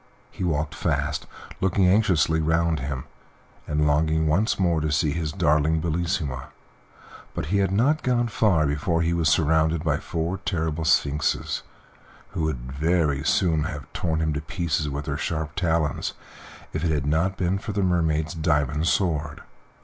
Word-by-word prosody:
He - - -6
walked 80 -3 -1
fast, - - -1 0.3
looking 95 0 +2
anxiously 85 -6 +3
round 80 0 +1
him, 65 -1 -4 0.6
and 75 0 +1
longing 80 +2 +2
once 90 +9 +2
more 85 -4 +2
to 75 0 -1
see 75 0 +2
his 80 -1 -2
darling 75 +2 +2
Bellissima, 80 -4 -2 0.9
but - - -2
he 100 - +3
had 95 -1 +1
not 135 +10 +2
gone 120 -1 +1
far 100 -8 +2
before 80 +4 0
he 85 +1 +1
was 85 -2 +2
surrounded 80 -1 +2
by 75 -3 +1
four 85 +4 -3
terrible 80 -4 -2
sphinxes 75 -2 +1 0.7
who - - -4
would 65 -5 -4
very 75 -1 +1
soon 80 -4 +2
have 75 -5 -7
torn 80 -2 -1
him 80 -1 0
to 75 - -3
pieces 80 -2 -2
with 70 +1 -4
their 70 -1 -2
sharp 80 -1 -3
talons 80 -3 0 0.6
if 75 - -2
it 85 - +1
had 75 -3 0
not 80 +6 +1
been 95 +2 0
for 105 - -5
the 100 -1 0
Mermaid's 80 -3 +1
diamond 75 -1 0
sword. 75 -6 0
80 Hz, 160 wpm, -25 LUFS, 75-85 Hz, 0.9 s, anxiously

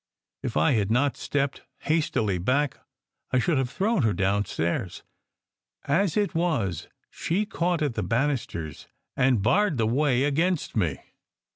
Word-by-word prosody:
If - - -3
I 80 +1 +4
had 105 -4 +1
not 125 +5 +2
stepped 140 -1 -2 0.2
hastily 110 - 0
back 135 +9 0 0.5
I 130 - +1
should 140 +3 +2
have 130 -2 -1
thrown 200 - +1
her 110 -4 +2
down 100 +1 +1
stairs. 85 +1 -2 0.8
As 170 +5 +1
it 205 -2 +1
was, 155 - -1 0.2
she 195 +6 -1
caught 175 -4 -1
at 145 -5 0
the - - -2
banisters 115 - -2 0.3
and 125 -5 +2
barred 185 - +3
the 115 - +2
way 130 +2 +2
against 160 +4 0
me. 85 -10 +1
135 Hz, 145 wpm, -26 LUFS, 105-160 Hz, 0.8 s, I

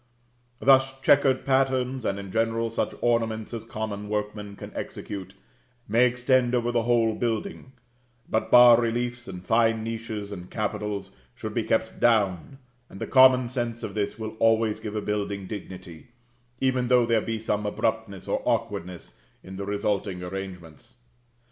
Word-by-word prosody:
Thus 135 0 +4
chequered 135 -1 +3
patterns, 130 -2 +1
and 100 - 0
in 100 -1 -7
general 115 +1 0
such - - -2
ornaments 115 -2 0
as 115 - -5
common 105 -1 -5
workmen 105 -1 -4
can - - -9
execute, 95 -1 -7 0.5
may 115 +4 +4
extend 125 0 +2
over 120 0 0
the 120 -1 +1
whole 115 -1 +2
building; 125 - -3 0.5
but 110 - -1
bas 120 -1 +8
reliefs, 120 +1 -2
and 90 -1 -8
fine 115 0 +2
niches 110 -2 -5
and 90 -2 -8
capitals, 105 -2 -3 0.2
should - - -6
be - - 0
kept - - -1
down, 105 - +1 0.3
and 95 - -11
the - - -3
common 130 -2 +6
sense 120 -2 -4
of - - -5
this 105 -1 -2
will 110 -1 -6
always 115 -1 +2
give 105 -1 -6
a 105 - -1
building 100 -1 -3
dignity, 90 -4 -9 0.5
even 130 -2 +1
though 125 -1 +4
there 115 -1 +2
be 115 +1 -3
some 105 -1 -2
abruptness 110 -2 -2
or - - -1
awkwardness, 105 -7 -3 0.2
in 95 +1 -9
the 100 +1 -5
resulting 100 -2 -2
arrangements. 90 -4 -8
110 Hz, 155 wpm, -26 LUFS, 100-120 Hz, 0.5 s, bas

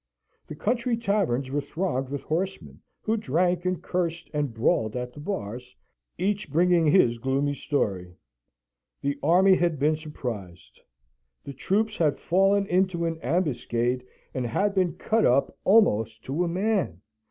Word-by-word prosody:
The - - -7
country 235 +6 0
taverns 190 - 0
were 145 +1 0
thronged 140 -5 -2
with 140 -1 -4
horsemen, 155 - -3 0.2
who 220 +1 +1
drank 175 +1 0
and 185 -1 -1
cursed 170 -2 -2
and 145 -3 -1
brawled 110 0 +1
at 125 0 -4
the - - -11
bars, 125 - -5 0.4
each 205 +3 -1
bringing 170 0 +3
his 120 -8 +4
gloomy 135 +3 0
story. 95 -12 -2 0.9
The 140 0 -2
army 185 +5 +5
had 170 -3 +1
been 150 +3 +2
surprised. 115 - -7 0.6
The 140 - -7
troops 210 - 0
had 155 -4 +2
fallen 195 +3 +2
into 185 -2 +1
an 165 -1 -2
ambuscade, 125 -5 0 0.3
and 125 -2 -2
had 200 - 0
been 185 -3 +1
cut 225 0 +1
up 130 +3 +2
almost 110 - +3
to 145 +7 -1
a - - 0
man. 185 - -1
155 Hz, 145 wpm, -26 LUFS, 125-185 Hz, 0.9 s, army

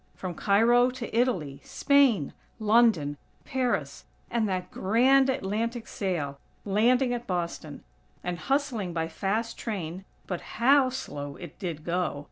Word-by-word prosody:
From 185 -2 -5
Cairo 230 +7 +4
to 250 -3 -6
Italy, 185 - 0
Spain, 270 - +3 0.3
London, 215 -10 +3 0.3
Paris, 260 -2 -2 0.3
and 225 -3 +1
that 185 -1 -3
grand 260 +7 +4
Atlantic 230 0 -2
sail, 150 -8 -3 0.3
landing 245 +5 +3
at 240 0 -5
Boston, 170 -4 -4 0.4
and 175 -1 -3
hustling 235 - -1
by 165 -1 -1
fast 205 +7 -2
train 185 -5 -4 0.2
(but 180 -3 -4 0.2
how 265 +3 +5
slow 145 - -6
it 175 -1 -11
did 170 -6 -5
go!!) 175 -3 -1
210 Hz, 125 wpm, -27 LUFS, 175-245 Hz, 0.4 s, how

